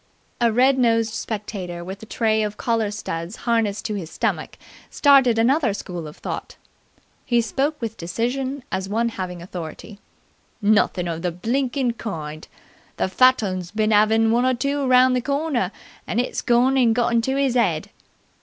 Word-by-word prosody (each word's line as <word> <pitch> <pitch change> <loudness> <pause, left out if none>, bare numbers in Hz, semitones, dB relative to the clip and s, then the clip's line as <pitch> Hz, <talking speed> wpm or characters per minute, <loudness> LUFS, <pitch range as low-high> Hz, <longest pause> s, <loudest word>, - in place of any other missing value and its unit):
A 235 -1 +3
red 260 +4 +3
nosed 230 -2 +2
spectator 200 -6 -5
with 190 +3 -8
a 220 - -10
tray 220 -1 +1
of 210 0 -3
collar 230 -3 0
studs 185 -3 -5
harnessed 225 -3 0
to 215 - -2
his 185 -6 -5
stomach - - -2 0.3
started 270 -5 +5
another 240 -1 +2
school 175 -5 -6
of 150 - -11
thought. - - -6 0.7
He 240 -2 +2
spoke 275 +7 -1
with 225 -2 -5
decision 250 +10 -3
as 190 0 -3
one 230 +3 +1
having 180 -5 -6
authority. 180 +3 -8 0.6
"Nothin' 205 -4 +2
of 165 -1 -3
the 180 0 -1
blinkin' 245 - -1
kind! 155 -7 -6 0.5
The - - 0
fat 255 +4 +4
'un's 185 -3 -3
bin 215 +2 +1
'avin' 220 +2 +4
one 240 +2 +3
or 255 0 +2
two 280 +4 -1
around 255 -1 +5
the 250 - +1
corner, 280 - -1 0.4
and 230 - -1
it's 250 - -1
gorn 250 +2 +3
and 235 -4 +4
got 240 -1 +1
into 235 +4 +1
'is 275 -3 +1
'ead!" 240 - +1
225 Hz, 165 wpm, -22 LUFS, 195-255 Hz, 0.7 s, started